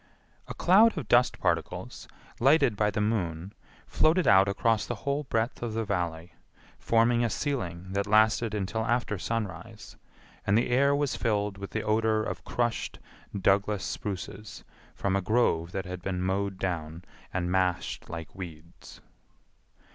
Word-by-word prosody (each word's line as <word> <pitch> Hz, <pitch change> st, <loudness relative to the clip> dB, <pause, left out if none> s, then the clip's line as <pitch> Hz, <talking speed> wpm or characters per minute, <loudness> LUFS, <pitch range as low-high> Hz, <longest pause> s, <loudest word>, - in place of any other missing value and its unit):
A -, -, -7 dB
cloud 200 Hz, +4 st, +5 dB
of 155 Hz, -, -4 dB
dust 120 Hz, +1 st, +4 dB
particles, -, -, -2 dB, 0.3 s
lighted 135 Hz, -2 st, +4 dB
by 105 Hz, 0 st, +2 dB
the 105 Hz, -, -3 dB
moon, 95 Hz, -4 st, -2 dB, 0.3 s
floated 165 Hz, +3 st, +2 dB
out 95 Hz, 0 st, +6 dB
across 110 Hz, +2 st, +1 dB
the 120 Hz, -, -2 dB
whole 140 Hz, +1 st, -1 dB
breadth 115 Hz, -1 st, -1 dB
of 115 Hz, -2 st, -3 dB
the 115 Hz, 0 st, -1 dB
Valley, 85 Hz, -2 st, -3 dB, 0.5 s
forming 115 Hz, +1 st, +3 dB
a 120 Hz, -, +1 dB
ceiling 95 Hz, -, -3 dB
that 100 Hz, +1 st, -1 dB
lasted 110 Hz, +1 st, +3 dB
until 105 Hz, +2 st, -2 dB
after 120 Hz, -3 st, -1 dB
sunrise, 105 Hz, 0 st, -5 dB, 0.5 s
and 100 Hz, +2 st, +4 dB
the 120 Hz, -, +1 dB
air 140 Hz, +3 st, +4 dB
was 145 Hz, -2 st, 0 dB
filled 105 Hz, -3 st, -1 dB
with 100 Hz, -, -6 dB
the 110 Hz, -, -3 dB
odor 110 Hz, 0 st, +1 dB
of -, -, -5 dB
crushed 120 Hz, -1 st, -2 dB, 0.4 s
Douglas 100 Hz, +1 st, +2 dB
spruces 100 Hz, +1 st, -6 dB, 0.3 s
from 100 Hz, -1 st, -1 dB
a 100 Hz, -, +1 dB
grove 90 Hz, -5 st, +1 dB
that 95 Hz, 0 st, -4 dB
had 90 Hz, 0 st, -6 dB
been 90 Hz, 0 st, -3 dB
mowed 95 Hz, +1 st, -1 dB
down 85 Hz, -3 st, -4 dB, 0.3 s
and 90 Hz, -1 st, -2 dB
mashed 90 Hz, -1 st, -1 dB
like 80 Hz, -1 st, -7 dB
weeds. 85 Hz, -3 st, -11 dB
105 Hz, 150 wpm, -28 LUFS, 95-115 Hz, 0.5 s, out